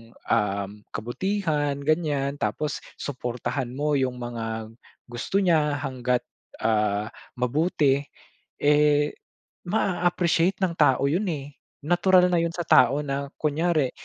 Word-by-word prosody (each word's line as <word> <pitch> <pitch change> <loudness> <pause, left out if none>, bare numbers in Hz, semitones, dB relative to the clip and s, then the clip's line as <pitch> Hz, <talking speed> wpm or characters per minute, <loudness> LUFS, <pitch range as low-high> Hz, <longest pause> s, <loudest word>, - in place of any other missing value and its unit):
um, 100 -3 -1 0.2
kabutihan 145 - -1
ganyan, 145 -3 0
tapos 150 -1 -1 0.2
suportahan 125 -1 -3
mo 150 +2 0
yung 130 -3 0
mga 115 -2 -5 0.3
gusto 120 +10 -3
niya 155 -5 +2
hangga't, 125 -2 -1 0.4
ah, 105 -1 +1 0.3
mabuti, 140 +2 +2 0.6
eh, 150 0 +3 0.6
maa-appreciate 175 -2 +1
ng 180 -3 +1
tao 140 -3 +4
'yon 185 +8 0
eh. 145 -3 -5 0.3
Natural 180 +2 +4
na 175 - +3
yon 170 - 0
sa 175 - -3
tao 130 +4 +5
na 140 0 -3
kunyari 155 -2 +1
145 Hz, 110 wpm, -25 LUFS, 125-165 Hz, 0.6 s, tao